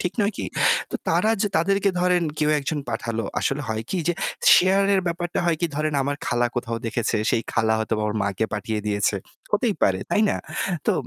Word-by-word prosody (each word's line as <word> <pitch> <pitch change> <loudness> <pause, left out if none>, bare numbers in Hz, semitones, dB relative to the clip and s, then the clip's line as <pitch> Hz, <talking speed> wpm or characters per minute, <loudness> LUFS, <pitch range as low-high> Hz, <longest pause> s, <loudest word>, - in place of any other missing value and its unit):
ঠিক 180 - -1
নয় 205 +1 +1
কি? - - -3 0.4
তো - - -7
তারা 220 - +3
যে 205 - +1
তাদেরকে 195 +4 +2
ধরেন 180 -1 +3 0.2
কেউ 150 -1 +2
একজন 150 +2 -2
পাঠালো 115 0 -2 0.2
আসলে 145 +2 -1
হয় 110 0 -2
কি 190 - -1
যে 175 - +4 0.4
share 195 +2 +4
এর 190 - +3
ব্যাপারটা 175 0 -2
হয় 170 -2 +2
কি 170 - +2
ধরেন 155 0 0
আমার 140 +1 -2
খালা 120 0 +2
কোথাও 115 -1 -2
দেখেছে 115 0 -1
সেই 115 - +1
খালা 110 -1 +2
হয়তোবা 110 -1 -1
ওর 105 - -3
মাকে 100 +2 0
পাঠিয়ে 105 +1 -2
দিয়েছে। 105 0 +1 0.4
হতেই 210 +1 +2
পারে 95 -1 +3
তাই 215 - +3
না? - - 0 0.5
তো - - +4
145 Hz, 200 wpm, -23 LUFS, 110-180 Hz, 0.5 s, যে